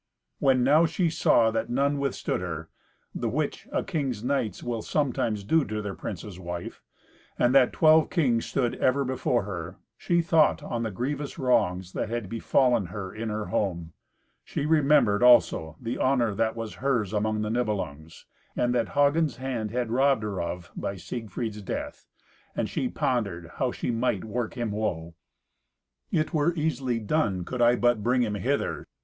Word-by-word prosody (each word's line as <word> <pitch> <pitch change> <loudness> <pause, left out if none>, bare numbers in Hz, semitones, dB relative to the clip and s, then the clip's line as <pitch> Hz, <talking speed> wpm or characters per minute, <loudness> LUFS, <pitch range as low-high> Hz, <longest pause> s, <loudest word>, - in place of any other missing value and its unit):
When 130 -2 +3
now 150 +6 +5
she 170 +1 0
saw 115 -7 +3
that 110 +1 -2
none 140 +3 +1
withstood 140 -8 -2
her 80 -3 -5 0.4
(the - - -2
which - - -2
a - - 0
king's 130 -9 -2
knights 130 -4 -1
will 120 -2 -2
sometimes 115 -7 -1
do 160 +9 +3
to 110 0 -3
their 105 -2 -4
prince's 95 -2 -7
wife), 85 -1 -6 0.6
and 120 +1 +3
that 135 -3 +5
twelve 155 0 +5
kings 125 -10 +1
stood 125 -4 0
ever 135 +2 +2
before 125 -3 0
her, 90 -2 -6 0.2
she 170 -1 +1
thought 165 -2 +3
on 120 - -3
the 115 - -1
grievous 135 +7 -4
wrongs 95 -8 +1
that - - -2
had 115 -4 -3
befallen 115 -2 +2
her 95 +1 -6
in 110 +1 -4
her 105 0 -3
home. 85 -5 -1 0.5
She 140 - -3
remembered 150 -9 +4
also 90 -10 +4
the 115 0 -4
honour 125 -5 +2
that 110 +2 0
was 115 -2 -5
hers 120 -7 0
among 110 0 0
the 105 - -2
Nibelungs, 95 -10 -3 0.3
and 120 0 +1
that 120 -2 0
Hagen's 145 -1 +3
hand 125 -4 -3
had 120 0 -2
robbed 135 -2 +3
her 100 -3 -3
of 85 +1 -5
by 100 - -3
Siegfried's 110 +2 -5
death, 100 - -5 0.5
and - - -1
she - - -2
pondered 95 -9 -2
how 130 -2 0
she - - -3
might 115 -5 0
work 115 +1 -3
him 120 -3 -2
woe. 85 -6 -3 1.0
"It 155 +3 0
were 160 +2 +2
easily 140 -6 -1
done, 105 - 0
could 125 +4 -4
I 120 +1 +5
but 120 -2 +2
bring 125 +3 +2
him 105 -3 -1
hither." 130 +8 -2
115 Hz, 170 wpm, -27 LUFS, 105-135 Hz, 1.0 s, now